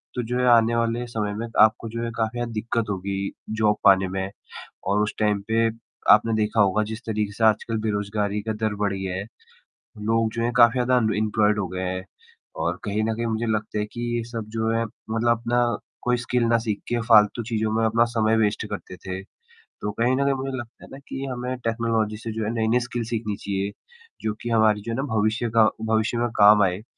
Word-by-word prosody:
तो 125 - 0
जो 125 - +1
है 125 - +2
आने 115 -1 +5
वाले 115 +1 0
समय 105 -3 -2
में 110 +3 -4 0.2
आपको 110 +1 +4
जो 115 +1 -4
है 115 - -3
काफ़ी 115 +1 -1
ना 120 - 0
दिक्कत 115 0 -2
होगी 95 0 -3 0.4
जॉब 105 -1 +3
पाने 95 -1 +5
में 95 0 -3 0.6
और 100 +2 +2
उस 105 - -2
टाइम 105 -2 +1
पे 115 +1 +3 0.5
आपने 115 - +4
देखा 110 0 +1
होगा 100 +1 +3
जिस 110 - -7
तरीके 105 -2 -1
से 110 - -1
आजकल 110 +1 +2
बेरोज़गारी 105 0 -1
का - - +1
दर 110 -1 -2
बढ़ 100 -1 -1
गया 95 -1 -3
है, 95 +2 -3 0.7
लोग 110 +1 +1
जो 115 0 -2
हैं 120 - +1
काफ़ी 120 -1 +6
ज़्यादा 125 0 +2
अनएम्प्लॉयड 105 -2 +2
हो 95 - -1
गए 90 +1 -4
हैं, 95 0 -3 0.5
और - - -2
कहीं 105 +1 -1
न 110 +1 0
कहीं 115 - -2
मुझे 115 0 -1
लगता 110 -1 -1
है 105 - 0
कि 120 - -5 0.2
ये 115 - -2
सब 115 -2 -4
जो 110 0 +1
है 115 0 +1
मतलब 115 +2 -1
अपना 120 +1 +1 0.4
कोई 125 0 +1
स्किल 120 0 0
ना 115 0 +3
सीख 110 -3 -3
के 120 - 0
फ़ालतू 110 +1 +5
चीज़ों 110 -1 0
में 115 - +2
अपना 115 +1 +3
समय 110 0 +3
वेस्ट 105 -2 +1
करते 90 - -6
थे, 95 +1 -6 0.4
तो 105 - -7
कहीं 120 +4 +1
न 140 - +1
कहीं 140 0 +2
मुझे 135 0 -4
लगता 120 -1 -10
है - - -13
ना 135 - -8
कि 135 - -5
हमें 125 +1 -3
टेक्नोलॉजी 115 -2 0
से 115 +1 -6
जो 110 0 -3
है 105 - -1
नए-नए 115 +2 +2
स्किल 120 -1 -3
सीखनी 110 -3 -2
चाहिए, 100 0 -3 0.5
जो 105 -1 -1
कि 120 - -3
हमारी 110 -2 +3
जो 115 - -4
है 115 - -2
ना 135 - -1
भविष्य 110 +2 +1
का 110 - +7 0.2
भविष्य 110 +1 +1
में 120 - +1
काम 105 0 +7
आए 95 +2 0
110 Hz, 220 wpm, -24 LUFS, 105-115 Hz, 0.7 s, का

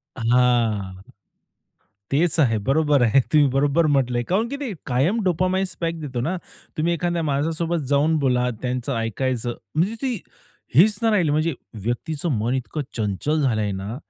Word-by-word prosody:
हां. 115 -6 +1 1.1
तेच 165 +3 +2
आहे, 115 -7 +3
बरोबर 145 -1 +3
आहे. 120 +4 +5
तुम्ही 150 -2 +6
बरोबर 145 +4 +2
म्हटलंय, 125 -3 +1
काऊन 220 +5 +2
की 280 - -4
ते 280 -6 -4
कायम 145 - +1
डोपामाइन 185 +2 +1
स्पाइक 165 -1 -4
देतो 130 -5 -4
ना. 185 +3 -1 0.4
तुम्ही 165 +2 +1
एखाद्या 170 0 -1
माणसासोबत 160 +2 -1
जाऊन 155 +3 +3
बोला 125 -1 +2
त्यांचं 125 +1 -2
ऐकायचं, 120 +1 -2 0.2
म्हणजे 180 +8 +1
ती 260 - 0 0.6
हीच 205 +7 +5
नाही 225 - +3
राहिली 175 -8 +2
म्हणजे 155 +2 +1 0.3
व्यक्तीचं 145 +7 -2
मन 115 +4 0
इतकं 130 +4 -3 0.2
चंचल 110 - -1
झाल 120 -6 +1
आहे 105 -2 -1
ना. 105 +5 -5
145 Hz, 155 wpm, -23 LUFS, 125-170 Hz, 1.1 s, तुम्ही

